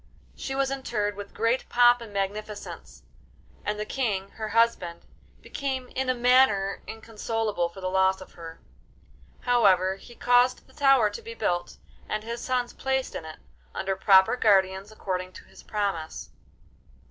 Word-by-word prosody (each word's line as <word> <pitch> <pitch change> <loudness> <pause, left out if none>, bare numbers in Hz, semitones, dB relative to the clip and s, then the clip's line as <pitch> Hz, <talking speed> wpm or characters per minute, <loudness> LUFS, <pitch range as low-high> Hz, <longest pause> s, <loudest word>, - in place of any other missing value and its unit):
She 270 - -5
was 270 0 +1
interred 225 -6 -2
with 200 0 -8
great 230 +3 0
pomp 245 0 +5
and 225 -3 -9
magnificence, 205 +1 -5 0.6
and 210 0 -2
the 210 - -2
King, 210 -6 -2
her 220 - -5
husband, 230 -8 +1 0.4
became 265 -3 -4
in 265 0 -2
a 255 - +2
manner 240 -6 +3
inconsolable 220 -4 -2
for 190 +3 -12
the 185 - -2
loss 190 0 +2
of 185 - -12
her. 165 -1 -10 0.8
However, 190 -6 +3
he 240 +4 -14
caused 245 +1 +3
the 260 - -22
tower 270 -7 +4
to - - -7
be 460 +1 -8
built 175 - -2 0.3
and 215 0 -2
his 235 +1 -5
sons 250 -2 -1
placed 265 -1 -1
in 160 - -6
it, 155 - -9 0.4
under 195 0 -1
proper 190 +2 +5
guardians, 195 -3 +2
according 185 -3 -4
to - - -12
his - - -16
promise. 200 -7 -3
215 Hz, 155 wpm, -26 LUFS, 190-245 Hz, 0.8 s, pomp